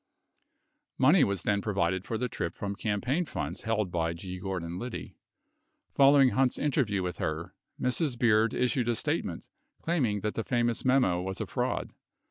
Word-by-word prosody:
63 -, -, -2 dB
Money 160 Hz, +7 st, +6 dB
was 100 Hz, -3 st, 0 dB
then 100 Hz, -1 st, +1 dB
provided 95 Hz, -3 st, 0 dB
for 115 Hz, -, -2 dB
the 125 Hz, +3 st, -1 dB
trip 85 Hz, -7 st, -4 dB
from 100 Hz, 0 st, -4 dB
campaign 120 Hz, -, -1 dB
funds 80 Hz, -, -5 dB
held 110 Hz, -4 st, -1 dB
by 85 Hz, -1 st, 0 dB
G. 90 Hz, +2 st, -7 dB
Gordon 90 Hz, -2 st, -4 dB
Liddy. 120 Hz, 0 st, -6 dB, 0.7 s
64 -, -, -44 dB
Following 140 Hz, -1 st, +6 dB
Hunt's 130 Hz, 0 st, +1 dB
interview 120 Hz, -10 st, 0 dB
with 90 Hz, -1 st, -3 dB
her, 80 Hz, +2 st, -3 dB, 0.3 s
Mrs. 125 Hz, +1 st, 0 dB
Beard 110 Hz, -2 st, +3 dB
issued 125 Hz, -1 st, +1 dB
a 120 Hz, -, +2 dB
statement -, -, -2 dB, 0.3 s
claiming 125 Hz, -, 0 dB
that 105 Hz, +1 st, -2 dB
the 115 Hz, -, -2 dB
famous 120 Hz, -1 st, 0 dB
memo 125 Hz, -10 st, +3 dB
was 95 Hz, +1 st, -4 dB
a -, -, -2 dB
fraud. -, -, -2 dB
110 Hz, 170 wpm, -29 LUFS, 95-125 Hz, 0.7 s, Money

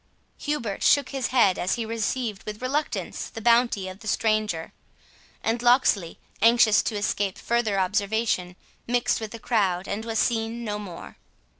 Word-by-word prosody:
Hubert 240 Hz, -10 st, -3 dB
shook 285 Hz, -2 st, +4 dB
his 270 Hz, -3 st, -2 dB
head 230 Hz, -7 st, +3 dB
as 180 Hz, -, 0 dB
he 230 Hz, -, -3 dB
received 225 Hz, -1 st, -2 dB
with 210 Hz, 0 st, -5 dB
reluctance 280 Hz, +4 st, -3 dB
the 225 Hz, -, -8 dB
bounty 235 Hz, -3 st, +3 dB
of 185 Hz, +1 st, -8 dB
the 215 Hz, -, -10 dB
stranger, 215 Hz, -7 st, 0 dB, 0.7 s
and 230 Hz, +1 st, 0 dB
Locksley, 240 Hz, -8 st, +3 dB, 0.2 s
anxious 230 Hz, -1 st, +5 dB
to 220 Hz, -, -3 dB
escape 205 Hz, -1 st, -1 dB
further 225 Hz, -4 st, 0 dB
observation, 200 Hz, -1 st, 0 dB, 0.3 s
mixed 240 Hz, -1 st, +1 dB
with 220 Hz, -, -4 dB
the 230 Hz, -, -8 dB
crowd, 195 Hz, -6 st, 0 dB
and 205 Hz, +2 st, -3 dB
was 225 Hz, -1 st, -3 dB
seen 230 Hz, +1 st, 0 dB
no 210 Hz, -2 st, -3 dB
more. 185 Hz, -5 st, -9 dB
220 Hz, 155 wpm, -25 LUFS, 200-235 Hz, 0.7 s, anxious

